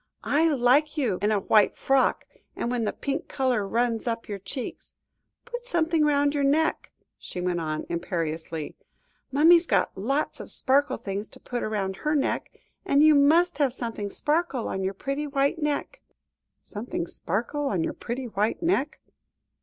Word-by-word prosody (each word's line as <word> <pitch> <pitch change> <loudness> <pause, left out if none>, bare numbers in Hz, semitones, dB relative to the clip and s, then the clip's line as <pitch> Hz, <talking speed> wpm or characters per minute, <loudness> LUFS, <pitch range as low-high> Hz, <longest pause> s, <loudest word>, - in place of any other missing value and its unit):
"I 315 +3 +3
like 285 +4 +3
you 235 -11 0
in 210 +1 +2
a 210 - +2
white 210 +1 +3
frock, 270 -1 +2 0.3
and 240 - -2
when 240 -2 0
the - - 0
pink 280 +3 -4
colour 250 -7 0
runs 235 +2 0
up 230 0 -2
your 205 -2 -5
cheeks. 245 +6 -7 0.5
Put 485 +1 -7
something 325 -5 +2
round 285 -1 +2
your 285 -1 0
neck," 310 +3 +1 0.3
she - - -6
went 180 -1 -1
on 155 -1 -3
imperiously. 165 -2 -3 0.6
"Mummy's 330 +5 +6
got - - +1
lots 270 +10 -1
of - - -8
sparkle 280 +2 +1
things 200 +2 -5
to - - -12
put 245 -1 -4
round 195 -3 -2
her 300 0 0
neck, 280 - -1 0.3
and 290 -6 +4
you 310 0 +7
must 305 +3 +4
have 275 -4 +2
something 230 -5 -4
sparkle 295 - -1
on 190 - -3
your 190 +1 -2
pretty 275 +7 -3
white 280 +3 0
neck." 295 -1 -2 0.6
"Something 210 -5 -4
sparkle 240 - -3
on 185 -9 0
your - - -2
pretty 250 +2 -5
white 215 - -1
neck." 320 -4 0
260 Hz, 165 wpm, -26 LUFS, 205-295 Hz, 0.6 s, you